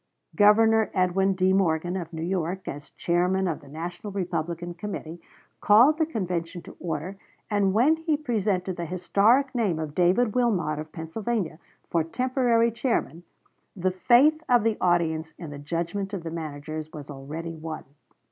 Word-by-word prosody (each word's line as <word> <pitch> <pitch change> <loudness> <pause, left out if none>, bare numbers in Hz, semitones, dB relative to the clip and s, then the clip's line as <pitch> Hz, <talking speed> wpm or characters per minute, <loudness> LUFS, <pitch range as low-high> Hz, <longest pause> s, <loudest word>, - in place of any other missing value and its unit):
Governor 220 +1 +5
Edwin 190 +1 +2
D. 185 0 +2
Morgan, 175 -2 +1
of 175 -3 -5
New 160 -1 -5
York, 180 +1 -2
as 145 0 -6
Chairman 180 +2 +1
of 165 - -3
the 145 - -16
National 175 +7 -6
Republican 175 -2 -3
Committee, 175 -3 -6 0.4
called 245 +10 +5
the 320 - +2
convention 180 - -3
to - - -12
order; 180 +3 -4 0.3
and 200 -2 +2
when 255 +11 +4
he 320 -2 0
presented 205 - -1
the 170 - -3
historic 205 - +2
name 215 -9 0
of 155 -2 -4
David 185 +7 +3
Wilmot, 190 -12 +1
of 155 0 -7
Pennsylvania, 170 +1 -3 0.3
for 165 -2 +1
temporary 240 - +1
chairman, 230 - -1 0.5
the 185 -1 0
faith 255 - +4
of 245 -3 +5
the 225 -1 +2
audience 160 -3 +1
in 165 -4 -8
the 145 - -8
judgment 170 +6 -3
of 180 - -6
the 165 - -5
managers 155 -1 -6
was 150 -3 -9
already 150 +5 -6
won. 160 0 -6
180 Hz, 155 wpm, -26 LUFS, 165-215 Hz, 0.5 s, Governor